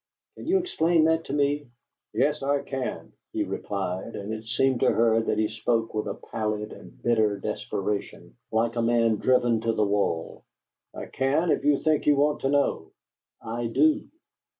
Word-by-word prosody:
Can - - -10
you 375 +3 +4
explain 170 - +2
that 160 0 +2
to - - -5
me?" 145 -1 0 0.4
"Yes, 145 +5 +1
I 140 +1 0
can," 135 -2 -5 0.2
he - - 0
replied, 95 +1 -4
and 100 +2 -5
it 110 0 -6
seemed 130 +2 +1
to - - +4
her 115 0 +3
that 110 - -1
he 110 0 +2
spoke 115 +1 -1
with 105 - -2
a - - -3 0.2
pallid 105 -1 -2
and - - -14
bitter 110 -3 +2
desperation, 100 -14 -4 0.2
like 115 +1 +1
a - - +2
man 115 -1 +3
driven 120 -1 +2
to 115 0 0
the 105 -1 +2
wall. 100 -5 -1 0.5
"I - - -7
can 150 +6 +1
if - - +1
you 145 -1 +2
think 155 -2 +1
you 145 - +6
want 145 +1 +2
to 135 - -1
know." 145 0 0 0.5
"I 115 +1 -3
do." 305 - +2
120 Hz, 175 wpm, -26 LUFS, 110-145 Hz, 0.5 s, you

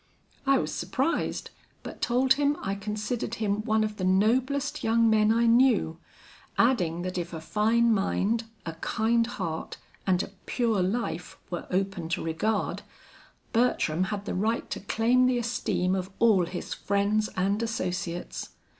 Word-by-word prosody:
I 275 - +5
was 155 - -2
surprised, 255 - -1 0.3
but - - -9
told 255 +2 +3
him 290 +1 +1
I 195 - -1
considered 210 +3 -3
him 210 -1 -1
one 220 -2 +2
of 215 -1 -3
the 185 - -4
noblest 250 +9 +1
young 230 +1 +3
men 215 -1 +4
I 230 +1 +3
knew, 230 -9 +4 0.6
adding 175 -9 +2
that 185 0 -3
if 175 0 -5
a 160 - -4
fine 225 +7 +2
mind, 215 +3 0 0.2
a 165 - -4
kind 225 +7 +1
heart, 170 -9 -4 0.3
and 185 0 +3
a - - -9 0.2
pure 230 -6 +1
life 185 -2 -2
were 175 - -4
open 185 -3 -1
to 170 - -1
regard, 185 +7 -1 0.7
Bertram 185 -8 +2
had 200 +1 -4
the - - -3
right 220 +5 0
to - - -2
claim 235 +5 +2
the 255 -1 +2
esteem 230 -6 0
of 190 -1 -2
all 205 -7 +4
his 175 0 -5
friends 205 +2 0
and 200 +3 +1
associates. 180 -6 -3
215 Hz, 155 wpm, -27 LUFS, 185-235 Hz, 0.7 s, I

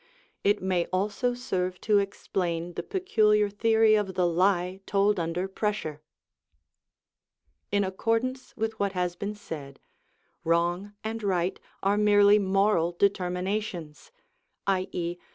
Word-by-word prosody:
It 205 -1 +2
may 180 -2 +1
also 210 +6 -1
serve 185 -7 -2
to 210 -1 +3
explain 175 -3 -2
the - - -3
peculiar 215 - +2
theory 220 +1 +4
of 205 -3 +1
the 180 -1 +2
lie 180 +1 +1
told 200 0 +2
under 170 +3 -2
pressure.(75) 190 -6 -3 1.7
In 200 0 +2
accordance 230 +7 -2
with 220 0 -2
what 200 -1 0
has 180 -1 -1
been 205 +3 -4
said, 145 -9 -8 0.6
wrong 175 +4 0
and 225 +1 -4
right 185 -3 0 0.2
are 200 +2 +2
merely 205 0 +6
moral 195 -3 +2
determinations, 180 - -2 0.5
_i.e. 180 -2 -1
195 Hz, 115 wpm, -27 LUFS, 180-210 Hz, 1.7 s, merely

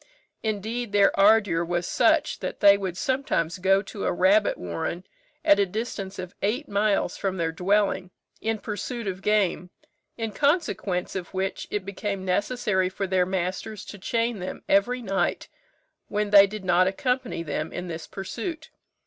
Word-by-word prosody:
Indeed, 220 +1 -3
their 200 -1 +5
ardour 200 -5 +5
was 175 +1 -1
such, - - +2
that - - -5
they 200 -1 +8
would 190 -3 -4
sometimes 255 - -1
go 195 +2 +3
to 200 0 -6
a - - +2
rabbit 200 +4 +3
warren, 90 - -4 0.4
at 200 - +6
a 200 - +4
distance 200 -1 -4
of 185 0 -6
eight 245 +9 -1
miles 205 -2 +1
from 190 -1 -2
their 165 -2 0
dwelling, 190 +1 +1 0.3
in 225 0 0
pursuit 225 +3 -5
of 190 -1 -4
game; 200 -3 +1 0.5
in 225 -2 -3
consequence 280 - 0
of 185 0 -5
which 190 +1 -2
it 205 -3 -3
became 200 -1 -4
necessary 190 -1 0
for 195 +1 -3
their 185 -1 +1
masters 190 +3 -3
to 205 - -9
chain 230 +2 -1
them 180 - -6
every 245 +6 +2
night 195 -2 -1 0.6
when 210 0 -1
they 200 -1 +9
did 205 -1 -7
not 180 +1 +4
accompany 250 -1 -1
them 155 0 -3
in 180 +1 -5
this 165 -1 -6
pursuit. 305 - -6
200 Hz, 160 wpm, -25 LUFS, 185-215 Hz, 0.6 s, they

